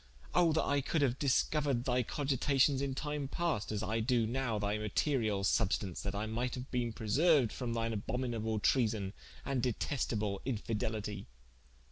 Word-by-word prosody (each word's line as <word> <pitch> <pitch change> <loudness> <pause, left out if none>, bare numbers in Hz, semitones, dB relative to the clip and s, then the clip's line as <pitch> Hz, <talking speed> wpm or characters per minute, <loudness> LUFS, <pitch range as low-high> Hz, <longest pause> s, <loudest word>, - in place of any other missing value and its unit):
oh 175 -2 +4
that 155 - +2
I 140 0 +2
could 145 +2 0
haue 140 - +4
discoured 140 -1 +1
thy 125 -1 +2
cogitations 135 +1 +1
in 135 -1 -2
time 150 -1 -3
past, 160 -9 -1
as 105 -1 -2
I 110 +2 0
doe 115 0 +2
now 120 -1 -1
thy 105 +1 -1
materiall 105 -2 0
substaunce, 95 -1 +1
that 100 -1 -3
I 105 +2 -1
might 120 +3 -2
haue 125 0 -5
bene 120 -2 0
preserued 130 +4 +3
from 120 -3 -3
thine 115 0 -1
abhominable 110 0 -2
treason, 105 -4 +1 0.3
and 135 -3 0
detestable 110 -5 -1
infidelitie." 110 -4 -3
120 Hz, 155 wpm, -33 LUFS, 110-135 Hz, 0.3 s, oh